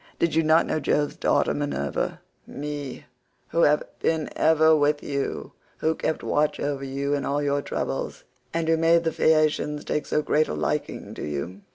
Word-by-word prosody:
Did 170 Hz, -2 st, +1 dB
you 160 Hz, -, +4 dB
not 160 Hz, +1 st, +4 dB
know 155 Hz, -, -1 dB
Jove's 145 Hz, 0 st, 0 dB
daughter -, -, +2 dB
Minerva—me, 145 Hz, -, -4 dB, 0.4 s
who 170 Hz, -, +1 dB
have 150 Hz, -1 st, +4 dB, 0.2 s
been 160 Hz, -2 st, 0 dB
ever 160 Hz, 0 st, +5 dB
with 145 Hz, 0 st, +2 dB
you, 140 Hz, -1 st, -3 dB, 0.3 s
who 160 Hz, -, +1 dB
kept 160 Hz, 0 st, -2 dB
watch 150 Hz, 0 st, +1 dB
over 140 Hz, -1 st, -2 dB
you 140 Hz, +1 st, -2 dB
in 140 Hz, -1 st, 0 dB
all 145 Hz, +2 st, -1 dB
your 140 Hz, 0 st, +1 dB
troubles, -, -, -4 dB, 0.3 s
and 165 Hz, -1 st, -1 dB
who 165 Hz, 0 st, +3 dB
made 165 Hz, +1 st, +4 dB
the 165 Hz, -, 0 dB
Phaeacians 155 Hz, -1 st, +2 dB
take 150 Hz, -, -2 dB
so 150 Hz, -, +1 dB
great 155 Hz, +1 st, +2 dB
a -, -, -3 dB
liking 75 Hz, -1 st, -3 dB
to -, -, -7 dB
you? 75 Hz, +7 st, -4 dB
150 Hz, 175 wpm, -25 LUFS, 140-160 Hz, 0.4 s, ever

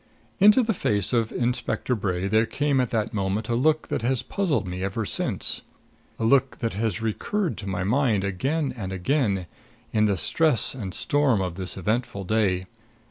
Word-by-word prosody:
Into 210 Hz, +6 st, +7 dB
the 225 Hz, 0 st, +1 dB
face 105 Hz, -, 0 dB
of 115 Hz, -2 st, +1 dB
Inspector 125 Hz, +1 st, -1 dB
Bray 95 Hz, -4 st, -1 dB
there 110 Hz, +3 st, +3 dB
came 145 Hz, -2 st, +1 dB
at 125 Hz, -, -1 dB
that 115 Hz, -1 st, -1 dB
moment 100 Hz, +2 st, -1 dB
a -, -, +1 dB
look 155 Hz, +5 st, +1 dB
that -, -, -1 dB
has 125 Hz, +1 st, 0 dB
puzzling 150 Hz, -, -1 dB
me 90 Hz, +1 st, -5 dB
ever 100 Hz, +3 st, -2 dB
since -, -, -1 dB, 0.6 s
a -, -, -3 dB
look 135 Hz, +2 st, +3 dB
that 115 Hz, -, -2 dB
has 110 Hz, +1 st, -2 dB
recurred 175 Hz, -, -1 dB
to 100 Hz, -, -7 dB
my 90 Hz, -1 st, -2 dB
mind 110 Hz, -1 st, +2 dB
again 135 Hz, -, -1 dB
and 95 Hz, -6 st, -5 dB
again, 100 Hz, -1 st, 0 dB, 0.5 s
in 110 Hz, -1 st, +3 dB
the 100 Hz, -2 st, +1 dB
stress 150 Hz, -, +3 dB
and 100 Hz, -8 st, -6 dB
storm 145 Hz, -7 st, +2 dB
of 90 Hz, -2 st, -2 dB
this 95 Hz, +1 st, -4 dB
eventful 105 Hz, +1 st, -2 dB
day. 95 Hz, -3 st, +1 dB
110 Hz, 180 wpm, -25 LUFS, 95-135 Hz, 0.6 s, Into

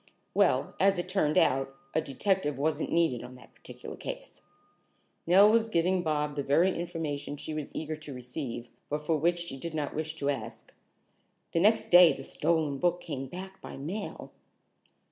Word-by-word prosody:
"Well, -, -, +2 dB
as 195 Hz, 0 st, +4 dB
it 175 Hz, -, -2 dB
turned 170 Hz, -6 st, +1 dB
out, 135 Hz, +1 st, +2 dB, 0.2 s
a 160 Hz, -, +2 dB
detective 150 Hz, 0 st, 0 dB
wasn't 155 Hz, +2 st, 0 dB
needed 165 Hz, -8 st, +2 dB
on 125 Hz, +1 st, -10 dB
that 125 Hz, -, -16 dB
particular -, -, -10 dB
case." -, -, -7 dB, 0.9 s
Nell 195 Hz, +4 st, +7 dB
was 225 Hz, 0 st, +3 dB
giving 180 Hz, 0 st, +2 dB
Bob 150 Hz, -3 st, -1 dB
the 145 Hz, -, -1 dB
very 165 Hz, +7 st, +3 dB
information 150 Hz, -4 st, -4 dB
she 155 Hz, -, -6 dB
was 155 Hz, -2 st, -4 dB
eager 155 Hz, 0 st, -3 dB
to 155 Hz, -1 st, -10 dB
receive, 125 Hz, -1 st, -6 dB, 0.2 s
but 150 Hz, +1 st, -3 dB
for 160 Hz, -, +2 dB
which 170 Hz, +3 st, +2 dB
she 170 Hz, -5 st, -5 dB
did 165 Hz, +3 st, -6 dB
not 150 Hz, -2 st, -2 dB
wish 155 Hz, +1 st, -3 dB
to 145 Hz, -2 st, 0 dB
ask. 115 Hz, -4 st, -5 dB, 0.8 s
"The 165 Hz, -, +1 dB
next 215 Hz, +5 st, +3 dB
day 175 Hz, -1 st, +9 dB
the 135 Hz, -, -8 dB
stolen 155 Hz, -2 st, 0 dB
book 175 Hz, +2 st, +2 dB
came 135 Hz, -6 st, -5 dB
back 190 Hz, +6 st, -9 dB
by -, -, -8 dB
mail." 180 Hz, +10 st, -5 dB
155 Hz, 175 wpm, -29 LUFS, 140-175 Hz, 0.9 s, day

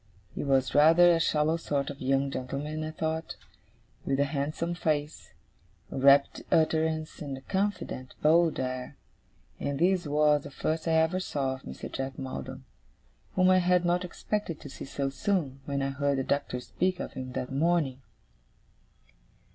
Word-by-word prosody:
He -, -, -4 dB
was 135 Hz, -2 st, +2 dB
rather 165 Hz, +4 st, +7 dB
a 165 Hz, -, +3 dB
shallow 155 Hz, 0 st, +2 dB
sort 145 Hz, -4 st, -2 dB
of 140 Hz, -, -11 dB
young 135 Hz, +1 st, +1 dB
gentleman, 145 Hz, +4 st, -4 dB
I 155 Hz, -, -3 dB
thought, 160 Hz, +1 st, -3 dB, 0.7 s
with 135 Hz, 0 st, 0 dB
a -, -, +5 dB
handsome 150 Hz, +4 st, -2 dB
face, 155 Hz, -3 st, -2 dB, 0.6 s
a -, -, -3 dB
rapid 140 Hz, +1 st, +5 dB
utterance, 160 Hz, 0 st, +1 dB
and 140 Hz, -3 st, -4 dB
a -, -, -11 dB
confident, 190 Hz, -8 st, -3 dB
bold 165 Hz, +2 st, +4 dB
air. 130 Hz, -1 st, -4 dB, 0.6 s
And 140 Hz, -1 st, -2 dB
this 180 Hz, 0 st, +2 dB
was 150 Hz, 0 st, +3 dB
the -, -, -9 dB
first 160 Hz, +4 st, -2 dB
I 165 Hz, -, +2 dB
ever 160 Hz, +3 st, +3 dB
saw 140 Hz, -7 st, -1 dB
of 130 Hz, -, -9 dB
Mr. -, -, -8 dB
Jack 135 Hz, 0 st, -4 dB
Maldon; 130 Hz, -, -6 dB, 0.7 s
whom 185 Hz, 0 st, +5 dB
I 185 Hz, -, +6 dB
had 180 Hz, 0 st, +3 dB
not 175 Hz, +1 st, +2 dB
expected 180 Hz, -1 st, -3 dB
to 145 Hz, -, -9 dB
see -, -, -8 dB
so 135 Hz, 0 st, -3 dB
soon, 155 Hz, -6 st, -1 dB
when 140 Hz, -1 st, -1 dB
I 135 Hz, -, 0 dB
heard 140 Hz, 0 st, 0 dB
the 135 Hz, -, 0 dB
Doctor 140 Hz, -2 st, -1 dB
speak 185 Hz, +6 st, -1 dB
of -, -, -5 dB
him 130 Hz, -1 st, -6 dB
that 125 Hz, -, -4 dB
morning. 145 Hz, -3 st, +1 dB
150 Hz, 165 wpm, -29 LUFS, 135-165 Hz, 0.7 s, rather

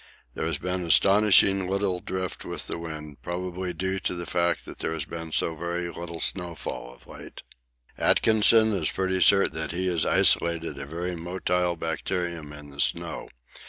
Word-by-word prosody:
There -, -, -3 dB
has -, -, -1 dB
been 90 Hz, 0 st, -2 dB
astonishingly 95 Hz, +2 st, +5 dB
little 95 Hz, -2 st, 0 dB
drift 95 Hz, 0 st, -5 dB
with -, -, -5 dB
the -, -, -5 dB
wind, 75 Hz, -3 st, -8 dB
probably 90 Hz, +1 st, -4 dB
due 95 Hz, +1 st, -2 dB
to 90 Hz, -, -2 dB
the 85 Hz, 0 st, -5 dB
fact 85 Hz, +1 st, 0 dB
that -, -, -10 dB
there -, -, -2 dB
has 80 Hz, -3 st, -4 dB
been 80 Hz, 0 st, -7 dB
so 80 Hz, +1 st, 0 dB
very 85 Hz, +2 st, -3 dB
little 85 Hz, -1 st, -7 dB
snowfall 85 Hz, -10 st, -4 dB
of -, -, -23 dB
late. -, -, -11 dB, 0.6 s
Atkinson 110 Hz, 0 st, +4 dB
is 90 Hz, -6 st, +1 dB
pretty 95 Hz, -1 st, -1 dB
certain 100 Hz, -1 st, +5 dB
that 80 Hz, -, -3 dB
he 90 Hz, +2 st, -2 dB
has 85 Hz, -3 st, +1 dB
isolated 85 Hz, -1 st, +3 dB
a 70 Hz, -, -7 dB
very 85 Hz, +4 st, -3 dB
motile 90 Hz, 0 st, -1 dB
bacterium 85 Hz, -1 st, -3 dB
in 75 Hz, -1 st, -10 dB
the 70 Hz, +1 st, -3 dB
snow. -, -, -2 dB
85 Hz, 170 wpm, -26 LUFS, 80-95 Hz, 0.6 s, astonishingly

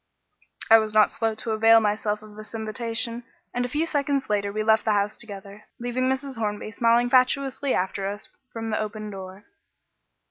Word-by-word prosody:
I 225 Hz, -, +10 dB
was 215 Hz, -1 st, -3 dB
not 215 Hz, -1 st, +6 dB
slow 225 Hz, -1 st, -1 dB
to 220 Hz, +1 st, -4 dB
avail 225 Hz, +1 st, +6 dB
myself 210 Hz, 0 st, -1 dB
of 210 Hz, -1 st, -13 dB
this 215 Hz, +1 st, -10 dB
invitation, 230 Hz, +2 st, -2 dB, 0.3 s
and 245 Hz, -, 0 dB
a -, -, -4 dB
few 300 Hz, +5 st, 0 dB
seconds 280 Hz, -6 st, -1 dB
later 200 Hz, -1 st, 0 dB
we 215 Hz, +1 st, -2 dB
left 220 Hz, 0 st, +3 dB
the 215 Hz, -, +2 dB
house 205 Hz, 0 st, 0 dB
together, 200 Hz, -1 st, -9 dB
leaving 245 Hz, +2 st, -1 dB
Mrs. 265 Hz, -2 st, -3 dB
Hornby 210 Hz, -1 st, -3 dB
smiling 235 Hz, +1 st, +3 dB
fatuously 265 Hz, +2 st, +2 dB
after 190 Hz, +1 st, -1 dB
us 205 Hz, +1 st, -5 dB, 0.2 s
from 225 Hz, -1 st, -5 dB
the 215 Hz, -, 0 dB
open 215 Hz, 0 st, -5 dB
door. 190 Hz, +1 st, -9 dB
220 Hz, 180 wpm, -25 LUFS, 210-245 Hz, 0.3 s, I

